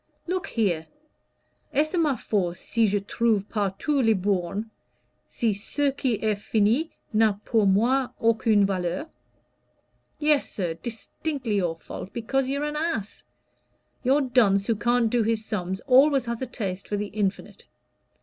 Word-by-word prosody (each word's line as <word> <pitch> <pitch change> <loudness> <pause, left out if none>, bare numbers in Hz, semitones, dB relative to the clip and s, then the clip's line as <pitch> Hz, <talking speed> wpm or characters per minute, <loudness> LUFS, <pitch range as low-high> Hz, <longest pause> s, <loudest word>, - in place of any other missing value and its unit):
Look 365 +1 -2
here! 175 -8 0 0.8
'Est 305 +3 +1
ce - - -2
ma 310 -6 +2
faute, 180 -7 -1
si 230 -2 +1
je 205 +1 +1
trouve 210 0 0
partout 210 +8 0
les 225 -3 +4
bornes, 195 +1 -1 0.6
si 225 -3 0
ce 275 +8 -1
qui 265 -2 -1
est 215 +1 0
fini 225 +10 +1 0.2
n'a 215 -2 +3
pour 220 -4 +2
moi 245 +7 +2
aucune 225 -2 +3
valeur?' 185 - -2 1.1
Yes, 300 -2 +2
sir, 175 -5 -2
distinctly 235 0 -3
your 175 -4 0
fault, 185 - -8
because 260 +3 -1
you're 280 +2 -1
an 300 0 -3
ass. 305 -10 -3 0.8
Your 270 +3 +3
dunce 225 -7 +3
who 230 - +1
can't 235 +1 +1
do 245 - +2
his 220 0 0
sums 190 -2 -3
always 275 0 +4
has 235 0 -4
a 260 - -2
taste 195 -5 -4
for 205 - -2
the 205 0 -3
infinite. 200 -2 -3
225 Hz, 150 wpm, -25 LUFS, 200-265 Hz, 1.1 s, les